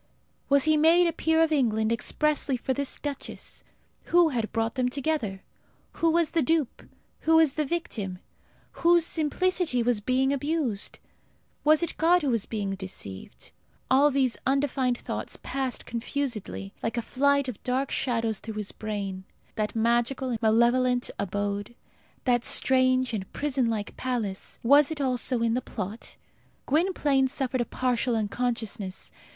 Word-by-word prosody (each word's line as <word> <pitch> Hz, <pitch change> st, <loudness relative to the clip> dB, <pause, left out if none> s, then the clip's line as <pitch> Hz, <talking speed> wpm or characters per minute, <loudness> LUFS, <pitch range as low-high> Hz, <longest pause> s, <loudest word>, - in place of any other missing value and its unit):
Was 280 Hz, -1 st, +5 dB
he 310 Hz, -1 st, +4 dB
made 330 Hz, +3 st, +5 dB
a 335 Hz, -, +1 dB
peer 320 Hz, 0 st, +2 dB
of 320 Hz, -, +1 dB
England 220 Hz, -6 st, +1 dB
expressly 285 Hz, +3 st, +1 dB
for 260 Hz, +2 st, -1 dB
this 280 Hz, +1 st, -3 dB
duchess? 285 Hz, -2 st, -7 dB, 0.4 s
Who 345 Hz, -1 st, +4 dB
had 230 Hz, -6 st, -2 dB
brought 225 Hz, 0 st, -1 dB
them 255 Hz, -2 st, 0 dB
together? 255 Hz, -8 st, -2 dB, 0.5 s
Who 330 Hz, -, +3 dB
was 335 Hz, -1 st, +2 dB
the 330 Hz, -, +2 dB
dupe? 305 Hz, -1 st, 0 dB, 0.4 s
Who 320 Hz, 0 st, +5 dB
the 300 Hz, +1 st, -2 dB
victim? 225 Hz, -, -3 dB, 0.6 s
Whose 340 Hz, -1 st, +5 dB
simplicity 330 Hz, -4 st, 0 dB
was 235 Hz, -3 st, +1 dB
being 260 Hz, +4 st, +1 dB
abused? 280 Hz, -7 st, -2 dB, 0.7 s
Was 310 Hz, +2 st, +5 dB
it 340 Hz, -, -3 dB
God 345 Hz, +1 st, +4 dB
who 275 Hz, -, +1 dB
was 230 Hz, -3 st, 0 dB
being 205 Hz, -3 st, -3 dB
deceived? 185 Hz, -, -8 dB, 0.4 s
All 280 Hz, +3 st, +6 dB
these 265 Hz, -3 st, +1 dB
undefined 265 Hz, -2 st, +1 dB
thoughts -, -, -5 dB
passed 265 Hz, -2 st, -3 dB
confusedly, 230 Hz, -, -4 dB
like 225 Hz, +1 st, -2 dB
a 235 Hz, -, -1 dB
flight 280 Hz, +2 st, +2 dB
of 250 Hz, -5 st, -6 dB
dark 260 Hz, +2 st, -1 dB
shadows, 230 Hz, -4 st, 0 dB
through 220 Hz, -1 st, -7 dB
his 210 Hz, -1 st, -4 dB
brain. 200 Hz, -3 st, -5 dB, 0.3 s
That 215 Hz, 0 st, -2 dB
magical 240 Hz, +3 st, +1 dB
and 230 Hz, -, -3 dB
malevolent 240 Hz, +3 st, +3 dB
abode, 205 Hz, +2 st, -3 dB, 0.5 s
that 240 Hz, -2 st, +2 dB
strange 255 Hz, -1 st, +2 dB
and 195 Hz, -3 st, -4 dB
prison 270 Hz, -4 st, 0 dB
like 215 Hz, -2 st, -3 dB
palace, 230 Hz, -7 st, -3 dB
was 285 Hz, +4 st, +6 dB
it 315 Hz, -2 st, -5 dB
also 250 Hz, -2 st, 0 dB
in 230 Hz, -1 st, +2 dB
the 250 Hz, -, 0 dB
plot? 210 Hz, -2 st, -7 dB, 0.5 s
Gwynplaine 295 Hz, -4 st, +2 dB
suffered 260 Hz, -1 st, -2 dB
a -, -, 0 dB
partial 250 Hz, -1 st, 0 dB
unconsciousness. 220 Hz, -3 st, -2 dB
255 Hz, 145 wpm, -27 LUFS, 225-290 Hz, 0.7 s, All